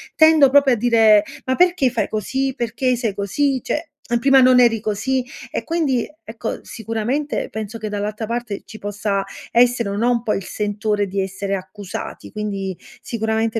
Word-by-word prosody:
tendo 315 Hz, -3 st, +6 dB
proprio 275 Hz, -1 st, +5 dB
a -, -, +3 dB
dire: 220 Hz, -2 st, +5 dB, 0.2 s
"Ma 260 Hz, -, +1 dB
perché 350 Hz, -6 st, +3 dB
fai 235 Hz, -2 st, -1 dB
così, 265 Hz, +5 st, -2 dB
perché 250 Hz, +1 st, 0 dB
sei 230 Hz, -4 st, -2 dB
così? 255 Hz, +7 st, 0 dB
Cioè, 305 Hz, +7 st, -3 dB, 0.2 s
a 240 Hz, -, +2 dB
prima 270 Hz, +1 st, +5 dB
non 255 Hz, 0 st, +6 dB
eri 235 Hz, -2 st, +4 dB
così." 245 Hz, +5 st, -1 dB, 0.3 s
E -, -, -3 dB
quindi, 300 Hz, -8 st, 0 dB, 0.2 s
ecco, 225 Hz, 0 st, -5 dB
sicuramente, 230 Hz, +7 st, -2 dB
penso 220 Hz, +1 st, -5 dB
che 215 Hz, -1 st, -5 dB
dall'alta 210 Hz, +2 st, -3 dB
parte 230 Hz, -2 st, -4 dB
ci 220 Hz, -, -10 dB
possa 205 Hz, -1 st, -2 dB, 0.3 s
essere 240 Hz, -2 st, +3 dB
o 200 Hz, -, -3 dB
no, 235 Hz, +4 st, +2 dB
un 235 Hz, -2 st, 0 dB
po' 215 Hz, -, 0 dB
il 195 Hz, -, -2 dB
sentore 210 Hz, +1 st, -1 dB
di 195 Hz, +1 st, -2 dB
essere 195 Hz, +1 st, -3 dB
accusati, 190 Hz, +1 st, -7 dB
quindi 195 Hz, -3 st, -3 dB, 0.2 s
sicuramente 225 Hz, 0 st, -1 dB
225 Hz, 170 wpm, -20 LUFS, 205-255 Hz, 0.3 s, tendo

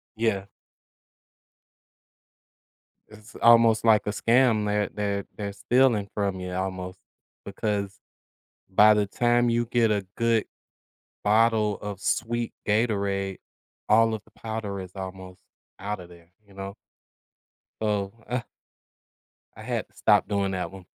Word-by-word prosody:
Yeah. 110 Hz, -4 st, 0 dB, 2.6 s
It's 105 Hz, +1 st, -16 dB
almost 115 Hz, -1 st, +5 dB
like 110 Hz, -2 st, +4 dB
a -, -, +2 dB
scam, 115 Hz, 0 st, +3 dB
they're 105 Hz, 0 st, 0 dB
they're 100 Hz, -1 st, -2 dB
they're 100 Hz, -1 st, -4 dB
stealing 115 Hz, 0 st, +2 dB
from 100 Hz, -2 st, -1 dB
you 90 Hz, 0 st, -5 dB
almost 95 Hz, 0 st, -4 dB, 0.5 s
because 100 Hz, -1 st, -3 dB, 0.7 s
by 105 Hz, +3 st, +6 dB
the 105 Hz, -1 st, +1 dB
time 120 Hz, +3 st, +2 dB
you 120 Hz, 0 st, +1 dB
get 115 Hz, -2 st, +2 dB
a 100 Hz, -3 st, 0 dB
good 115 Hz, -1 st, +2 dB, 0.8 s
bottle 110 Hz, -1 st, +3 dB
of 100 Hz, -2 st, -6 dB
sweet 120 Hz, +2 st, -1 dB, 0.2 s
Gatorade, 100 Hz, -3 st, 0 dB, 0.5 s
all 115 Hz, +1 st, +4 dB
of 110 Hz, -, -5 dB
the -, -, -24 dB
powder 110 Hz, -3 st, -4 dB
is 90 Hz, -1 st, -9 dB
almost 95 Hz, -1 st, -8 dB, 0.4 s
out 105 Hz, +1 st, -3 dB
of 90 Hz, -, -11 dB
there, 85 Hz, 0 st, -18 dB
you 100 Hz, -, -19 dB
know? 95 Hz, 0 st, -7 dB, 1.1 s
So, 105 Hz, -2 st, -1 dB, 0.2 s
uh 125 Hz, 0 st, -1 dB, 1.1 s
I -, -, -11 dB
had -, -, -3 dB
to -, -, -32 dB
stop -, -, +3 dB
doing 100 Hz, -2 st, 0 dB
that 95 Hz, 0 st, -3 dB
one. 95 Hz, -2 st, -12 dB
105 Hz, 130 wpm, -26 LUFS, 95-115 Hz, 2.6 s, by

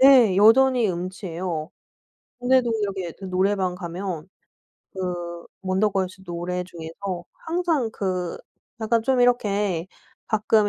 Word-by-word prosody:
네 255 Hz, -8 st, +7 dB
여전히 240 Hz, +3 st, +6 dB
음치예요. 175 Hz, -2 st, -4 dB, 0.7 s
그런데도 250 Hz, -1 st, +3 dB
이렇게 190 Hz, -4 st, -3 dB
그 195 Hz, -, -7 dB
노래방 185 Hz, 0 st, +1 dB
가면 180 Hz, -1 st, -5 dB, 0.7 s
그 175 Hz, -2 st, -4 dB, 0.2 s
원더걸스 190 Hz, -1 st, 0 dB
노래 175 Hz, +1 st, -2 dB
중에서 175 Hz, +1 st, -6 dB, 0.2 s
항상 325 Hz, -8 st, +1 dB
그 185 Hz, -4 st, -2 dB, 0.4 s
약간 225 Hz, +1 st, +2 dB
좀 255 Hz, +1 st, +2 dB
이렇게 205 Hz, -7 st, +2 dB, 0.4 s
가끔 215 Hz, 0 st, +3 dB
190 Hz, 235 characters per minute, -24 LUFS, 180-225 Hz, 0.7 s, 네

